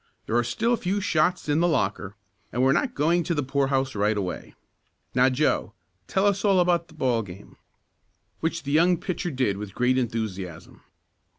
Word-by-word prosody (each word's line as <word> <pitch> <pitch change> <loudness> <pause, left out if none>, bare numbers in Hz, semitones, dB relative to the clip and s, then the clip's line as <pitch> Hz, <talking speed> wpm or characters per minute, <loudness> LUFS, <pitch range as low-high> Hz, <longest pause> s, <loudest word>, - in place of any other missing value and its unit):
There 115 - -2
are 120 - +3
still 230 - 0
a - - +2
few 195 +1 -1
shots 180 -3 +1
in 150 +1 +2
the 175 - +3
locker, 105 - -1 0.4
and 125 +2 0
we're 135 - +5
not 250 - 0
going 170 +4 +2
to 170 0 -2
the 145 - 0
poorhouse 135 0 0
right 105 +1 +1
away. 90 -3 -5 0.6
Now, 130 +1 +4
Joe, 130 -6 0 0.3
tell 190 +1 +1
us 200 -1 +1
all 195 -3 +4
about 175 -1 +2
the 160 - -18
ball 125 -6 +1
game." 95 -1 -11 0.8
Which 165 +1 -2
the 140 - -4
young 170 +4 +4
pitcher 180 0 -3
did 130 -9 0
with 100 -1 -7
great 125 +1 +2
enthusiasm. 105 -8 -5
135 Hz, 185 wpm, -25 LUFS, 115-175 Hz, 0.8 s, we're